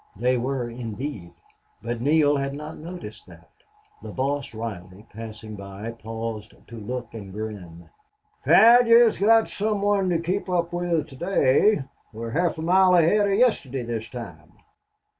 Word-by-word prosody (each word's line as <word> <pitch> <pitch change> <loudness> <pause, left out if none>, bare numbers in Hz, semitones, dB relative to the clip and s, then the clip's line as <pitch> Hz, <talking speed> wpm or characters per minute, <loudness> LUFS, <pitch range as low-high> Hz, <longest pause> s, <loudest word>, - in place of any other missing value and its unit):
They 125 +5 +1
were, 125 0 -2
indeed, 115 -4 -6 0.5
but 120 0 -4
Neale 145 +1 +3
had 140 0 -3
not 150 +2 -8
noted 175 +3 -8
that. - - -17 0.5
The - - -9
boss, 140 +1 -2
Reilly, 105 -3 -8
passing 110 0 -8
by, 100 +3 -7
paused 115 -1 -7
to 115 - -9
look 120 +2 -6
and 100 -4 -9
grin. 95 -5 -8 0.6
"Pat, 235 +2 +7
yez 230 -1 +5
got 225 +2 +4
some 210 -1 -2
one 200 -2 +2
to 175 - +2
kape 185 +4 -3
up 175 -1 -1
with 175 -3 -1
to 135 - -12
day. 170 +2 +2 0.3
We're 115 +1 -6
half 175 +5 0
a 160 - -5
mile 185 +2 +4
ahead 190 +5 +4
of 195 0 +1
yestidy 140 - +1
this 115 -1 -5
time." 90 -12 -10
135 Hz, 155 wpm, -24 LUFS, 115-175 Hz, 0.6 s, Pat